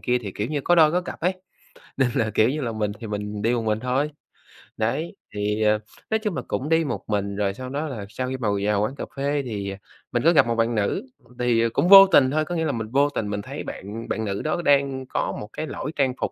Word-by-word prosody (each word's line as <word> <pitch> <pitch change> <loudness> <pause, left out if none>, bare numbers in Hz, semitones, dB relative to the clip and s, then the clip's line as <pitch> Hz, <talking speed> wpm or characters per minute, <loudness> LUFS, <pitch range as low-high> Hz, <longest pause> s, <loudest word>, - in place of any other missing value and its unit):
kia 125 0 +1
thì, 100 -6 -7
kiểu 105 - -2
như, 150 -2 -1
có 175 - +3
đôi 155 -2 +6
có 180 - +2
cặp 180 - -8
ấy, 180 +3 +2 0.7
nên 130 -2 +3
là, 110 -1 +1
kiểu 110 +3 +4
như 150 +3 -2
là, 120 -4 -2
mình 105 -2 -2
thì 115 - -7
mình 105 0 -4
đi 115 +3 +2
một 120 - 0
mình 110 0 0
thôi. 130 +4 0 0.7
Đấy, 120 +10 -1 0.2
thì, 105 +1 -1
à, 105 0 +3 0.3
nói 220 - +2
chung 210 -5 -2
là - - -2
cũng 145 - -2
đi 165 0 +3
một 135 -6 -3
mình 100 -1 -1
rồi 100 -1 0
sau 130 +4 -7
đó 145 +4 -3
là 115 -8 -6
sau 125 +4 -4
khi 130 - -3
mà 115 - -2 0.2
vào 105 -1 +2
quán 125 +6 -1
cà - - -5
phê 140 +1 0
thì 100 -4 -4 0.4
mình 120 +1 0
có 170 - +5
gặp 140 -6 +5
một 115 - 0
bạn 115 +1 +1
nữ, 110 - 0 0.4
thì 115 -1 +2
cũng 175 - +2
vô 195 0 +11
tình 130 -7 +5
thôi, 155 +1 +1
có 175 - -4
nghĩa 160 -1 0
là 150 - +1
mình 110 -3 -4
vô 140 +2 +3
tình 110 -7 -3
mình 100 0 -2
thấy - - -7
bạn 110 +4 -7
bạn 110 - -2
nữ 100 -1 -2
đó 155 +3 -1
đang 140 -2 +2
có - - -2
một 105 - -8
cái 155 - -4
lỗi 150 - -5
trang 135 -3 +1
phục - - -1
125 Hz, 270 wpm, -24 LUFS, 105-145 Hz, 0.7 s, vô